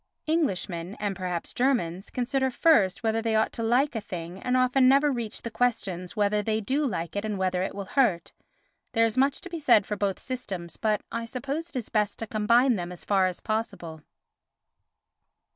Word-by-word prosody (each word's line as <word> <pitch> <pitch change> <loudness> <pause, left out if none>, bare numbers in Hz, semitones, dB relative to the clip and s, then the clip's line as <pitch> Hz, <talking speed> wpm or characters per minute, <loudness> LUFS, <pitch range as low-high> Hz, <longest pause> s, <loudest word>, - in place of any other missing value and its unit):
Englishmen, 195 - -1
and 205 -2 -2
perhaps 180 -2 -4
Germans, 220 -9 0
consider 265 +2 0
first 240 - +3
whether 225 0 +1
they 225 -1 0
ought 220 - +2
to - - -5
like 245 +5 +2
a 225 - -3
thing 175 0 -7
and 250 0 +1
often 255 +1 +4
never 280 +2 +4
reach 235 -4 -4
the 230 - -5
questions 195 -7 -1
whether 210 0 +2
they 215 +1 0
do 275 +7 0
like 170 -6 -4
it 205 - -1
and 215 -2 -2
whether 185 -1 0
it 190 - -3
will 200 -1 -5
hurt. 190 - +1 0.6
There 230 -1 +4
is 225 - -1
much 270 +2 +2
to 370 - -9
be 335 - -4
said 240 -9 +5
for 210 - -3
both 200 -2 -1
systems, 190 -10 -5
but 215 -2 0
I 230 0 -3
suppose 280 +8 -4
it - - -23
is 245 -4 -3
best 210 -2 0
to 225 - -4
combine 235 +3 +3
them 175 -1 -4
as 180 - -9
far 195 -2 +3
as 180 - -5
possible. 175 -8 -3
220 Hz, 195 wpm, -27 LUFS, 190-255 Hz, 0.6 s, said